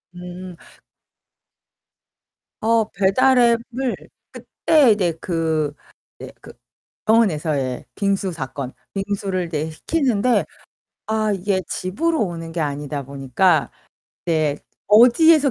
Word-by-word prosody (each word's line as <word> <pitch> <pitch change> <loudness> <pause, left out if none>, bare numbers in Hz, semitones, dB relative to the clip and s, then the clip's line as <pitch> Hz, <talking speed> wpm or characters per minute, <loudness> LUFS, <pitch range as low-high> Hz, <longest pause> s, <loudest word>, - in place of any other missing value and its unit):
음. 180 0 -9 2.1
어 225 0 +2
배달 250 +7 +3
앱을 240 +1 +1 0.4
그때 300 -7 +2
이제 185 -5 +1
그 160 -4 -1 0.5
이제 - - -9
그 - - -12 0.5
병원에서의 155 - +1
빙수 195 -2 0
사건. 135 -3 -6 0.2
빙수를 195 -2 -2
이제 160 -1 -3
시키는데 250 - +1 0.6
아 215 -1 0
이게 190 0 -1
집으로 310 - -1
오는 165 -2 -6
게 170 - -2
아니다 145 -1 -3
보니까 140 +5 +1 0.6
이제 155 -3 +1 0.3
어디에서 275 +7 +6
190 Hz, 205 characters per minute, -21 LUFS, 155-230 Hz, 2.1 s, 어디에서